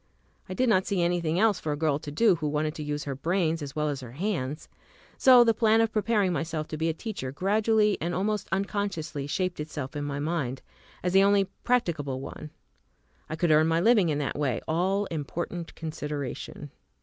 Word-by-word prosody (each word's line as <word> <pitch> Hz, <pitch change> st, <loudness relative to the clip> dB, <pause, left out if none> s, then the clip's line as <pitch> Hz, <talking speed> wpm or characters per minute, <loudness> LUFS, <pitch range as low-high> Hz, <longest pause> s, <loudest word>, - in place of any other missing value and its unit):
I 185 Hz, -, -4 dB
did 255 Hz, +4 st, +2 dB
not 190 Hz, -5 st, +3 dB
see 190 Hz, -3 st, +1 dB
anything 170 Hz, -2 st, 0 dB
else 215 Hz, -3 st, +3 dB
for 155 Hz, -, -3 dB
a 145 Hz, -, -2 dB
girl 150 Hz, -2 st, +1 dB
to 150 Hz, -, -8 dB
do 195 Hz, +8 st, +4 dB
who 155 Hz, -2 st, -2 dB
wanted 150 Hz, +1 st, -1 dB
to 160 Hz, -, -7 dB
use 145 Hz, 0 st, -3 dB
her 140 Hz, -, -3 dB
brains 165 Hz, +3 st, 0 dB
as 140 Hz, -2 st, -6 dB
well 150 Hz, 0 st, 0 dB
as 140 Hz, -2 st, -3 dB
her 120 Hz, -2 st, -10 dB
hands. 155 Hz, -4 st, -3 dB, 0.5 s
So 255 Hz, -2 st, +7 dB
the 230 Hz, -1 st, +3 dB
plan 220 Hz, 0 st, +3 dB
of 225 Hz, -1 st, +2 dB
preparing 210 Hz, -4 st, +1 dB
myself 160 Hz, 0 st, -3 dB
to 155 Hz, -, -4 dB
be 160 Hz, +1 st, 0 dB
a -, -, 0 dB
teacher 185 Hz, -, -5 dB
gradually 210 Hz, +5 st, +2 dB
and 170 Hz, +1 st, -1 dB
almost 205 Hz, +2 st, -1 dB
unconsciously 190 Hz, -7 st, -2 dB
shaped 185 Hz, +3 st, -2 dB
itself 150 Hz, -3 st, -5 dB
in 145 Hz, -, -3 dB
my 145 Hz, -1 st, -3 dB
mind 145 Hz, -4 st, -2 dB, 0.4 s
as 180 Hz, 0 st, 0 dB
the 195 Hz, -, +7 dB
only 200 Hz, 0 st, +4 dB, 0.2 s
practicable 155 Hz, -, 0 dB
one. 150 Hz, +3 st, -8 dB, 0.8 s
I 155 Hz, -, -3 dB
could 170 Hz, 0 st, +1 dB
earn 155 Hz, +1 st, +5 dB
my 165 Hz, 0 st, +2 dB
living 205 Hz, -2 st, +4 dB
in 150 Hz, -, 0 dB
that 145 Hz, 0 st, -2 dB
way, 130 Hz, -6 st, 0 dB
all 190 Hz, +5 st, +1 dB
important 170 Hz, +2 st, -4 dB
consideration. 150 Hz, -3 st, -5 dB
165 Hz, 200 wpm, -27 LUFS, 150-195 Hz, 0.8 s, So